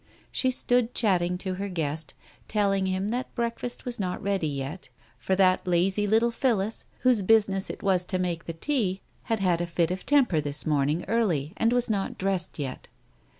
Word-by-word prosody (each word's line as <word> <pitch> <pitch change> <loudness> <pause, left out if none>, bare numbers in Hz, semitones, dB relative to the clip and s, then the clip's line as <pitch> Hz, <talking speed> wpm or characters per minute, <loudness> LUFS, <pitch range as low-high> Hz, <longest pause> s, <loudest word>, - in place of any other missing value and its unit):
She 260 - +1
stood 245 -1 +1
chatting 180 -5 +2
to 185 0 -4
her 200 - -3
guest, 160 -4 -3 0.3
telling 195 -2 +1
him 190 +2 -1
that 250 +3 -3
break 235 -1 -2
fast 245 - -3
was 245 -2 -3
not 180 -2 -2
ready 195 -4 -1
yet, 140 +2 -5 0.3
for 190 - 0
that 185 -1 +3
lazy 190 +4 +2
little 225 +3 +3
Phillis, 225 -4 0 0.2
whose 250 -4 +3
business 195 -1 +3
it - - -7
was 185 -2 +3
to 185 - -2
make 175 -2 -2
the 165 - -4
tea, 195 - -1 0.2
had 225 -3 -1
had 175 -3 +2
a 175 - -2
fit 170 0 0
of 185 0 -4
temper 255 - +3
this 145 0 -1
morning 150 +2 +1
early, 175 -10 0
and 225 +1 +2
was 245 0 +2
not 205 -4 -2
dressed 190 -1 -2
yet. 135 -4 -5
190 Hz, 190 wpm, -27 LUFS, 175-225 Hz, 0.3 s, that